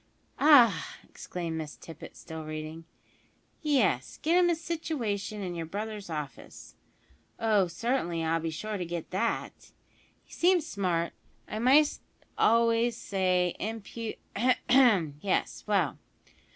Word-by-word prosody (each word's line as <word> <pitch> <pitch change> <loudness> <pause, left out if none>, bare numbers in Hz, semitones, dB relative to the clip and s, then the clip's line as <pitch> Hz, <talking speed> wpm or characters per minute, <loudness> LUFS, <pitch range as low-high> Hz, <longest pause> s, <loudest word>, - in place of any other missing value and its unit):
"Ah!" 240 - +5
exclaimed 165 -2 -5
Miss 150 -2 -6
Tippet, 165 -2 -11
still 160 -1 -8
reading, 155 +1 -6 0.8
"yes; 255 - +1
`get 315 - +1
him 350 -1 +4
a 340 - +3
situation 240 -12 -3
in 180 -2 -4
your 165 -2 -5
brother's 210 +1 -5
office,' 150 -4 -7 0.6
(oh, 215 -4 +3
certainly, 175 -3 -1
I'll 165 +1 +1
be 165 0 -3
sure 210 +7 -4
to 180 - -3
get 170 -1 -5
that); 230 +5 -1 0.7
`he - - -23
seems 350 -2 +3
smart, 180 - -1 0.3
I 215 - -4
might 280 +5 +4 0.4
almost 230 0 +3
say 185 -4 0
impu 225 +1 -5 0.2
' - - -35
Ahem! 225 - +3
Yes, 195 - -1
well 195 -8 +1
200 Hz, 125 wpm, -29 LUFS, 165-235 Hz, 0.8 s, Ah